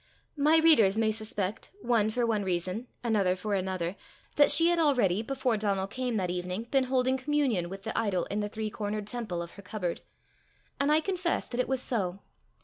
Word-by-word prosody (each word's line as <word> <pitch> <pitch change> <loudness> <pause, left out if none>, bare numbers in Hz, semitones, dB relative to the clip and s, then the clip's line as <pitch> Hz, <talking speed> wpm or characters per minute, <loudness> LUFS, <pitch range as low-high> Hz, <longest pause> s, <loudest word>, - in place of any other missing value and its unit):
My 300 +2 +4
readers 265 -12 +5
may 220 -1 +2
suspect, 215 -2 -4
one 230 -3 +2
for 240 +2 0
one 215 -3 0
reason, 185 +5 -2 0.2
another 205 -6 +2
for 205 +3 -3
another, 185 -2 -2 0.4
that 290 - +6
she 335 +1 +5
had 345 -1 +2
already, 245 - +3
before 255 -1 -1
Donal 200 -2 0
came 245 +3 -3
that 180 -3 -1
evening, 180 +4 -3
been 270 -2 +3
holding 260 0 +1
communion 260 - 0
with 195 +1 -8
the 220 - -4
idol 200 -6 0
in 205 - -3
the 210 0 -2
three 215 0 -4
cornered 210 0 -3
temple 210 -6 -3
of 170 - -10
her 200 - -12
cupboard; 185 -3 -4 0.8
and 280 +1 +2
I 310 +1 +4
confess 365 -1 -1
that 240 - -4
it 250 - +1
was 265 -1 0
so. 190 -7 -1
220 Hz, 195 wpm, -29 LUFS, 190-260 Hz, 0.8 s, that